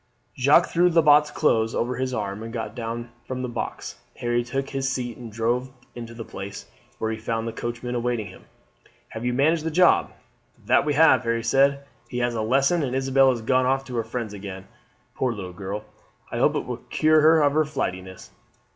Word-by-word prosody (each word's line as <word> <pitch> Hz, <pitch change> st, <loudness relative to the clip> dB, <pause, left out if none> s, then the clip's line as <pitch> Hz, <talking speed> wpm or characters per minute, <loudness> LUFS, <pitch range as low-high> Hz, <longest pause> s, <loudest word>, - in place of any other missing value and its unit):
Jacques 140 Hz, +6 st, +5 dB
threw 175 Hz, +1 st, +3 dB
Lebat's 150 Hz, -3 st, +5 dB
clothes 115 Hz, -7 st, +1 dB
over 125 Hz, +2 st, -1 dB
his 130 Hz, 0 st, -2 dB
arm 105 Hz, -3 st, -3 dB
and 115 Hz, 0 st, -7 dB
got 115 Hz, -2 st, -5 dB
down 120 Hz, 0 st, -5 dB, 0.2 s
from 130 Hz, 0 st, -4 dB
the -, -, -2 dB
box. 120 Hz, -, -5 dB, 0.2 s
Harry 120 Hz, 0 st, 0 dB
took 135 Hz, +3 st, -3 dB
his 135 Hz, -1 st, -1 dB
seat 125 Hz, -3 st, -3 dB
and 120 Hz, -3 st, -10 dB
drove 120 Hz, +4 st, -1 dB, 0.2 s
into 115 Hz, -1 st, -8 dB
the 115 Hz, -1 st, -7 dB
Place, 100 Hz, +1 st, -8 dB, 0.3 s
where 110 Hz, -, -2 dB
he 110 Hz, -, -4 dB
found 115 Hz, +1 st, -2 dB
the 115 Hz, -, -4 dB
coachman 120 Hz, +1 st, -4 dB
awaiting 120 Hz, -2 st, -1 dB
him. -, -, -13 dB, 0.6 s
"Have 110 Hz, +2 st, -6 dB
you 125 Hz, -, +1 dB
managed 155 Hz, +5 st, +2 dB
the 160 Hz, -, -1 dB
job?" 180 Hz, +3 st, +4 dB, 0.5 s
"That 125 Hz, +5 st, +3 dB
we 150 Hz, -1 st, 0 dB
have," 160 Hz, +2 st, +6 dB
Harry 115 Hz, -1 st, -1 dB
said. 140 Hz, +2 st, +3 dB, 0.3 s
"He 125 Hz, -, -5 dB
has 120 Hz, 0 st, 0 dB
a 115 Hz, -, -2 dB
lesson, 135 Hz, +9 st, +2 dB
and 130 Hz, -3 st, -2 dB
Isabel 135 Hz, 0 st, +4 dB
has 120 Hz, -3 st, -1 dB
gone 130 Hz, +2 st, +2 dB
off 135 Hz, +1 st, +1 dB
to 125 Hz, -, -7 dB
her 115 Hz, -, 0 dB
friends 115 Hz, -1 st, -5 dB
again. 95 Hz, -1 st, -8 dB, 0.5 s
Poor 125 Hz, -2 st, -1 dB
little 95 Hz, -4 st, -7 dB
girl, 100 Hz, +2 st, -5 dB, 0.5 s
I -, -, -3 dB
hope -, -, +3 dB
it -, -, -2 dB
will -, -, -4 dB
cure 155 Hz, 0 st, +2 dB
her 160 Hz, 0 st, +5 dB
of 145 Hz, -1 st, +3 dB
her 155 Hz, +1 st, +3 dB
flightiness. 95 Hz, -11 st, -5 dB
125 Hz, 205 wpm, -24 LUFS, 115-135 Hz, 0.6 s, have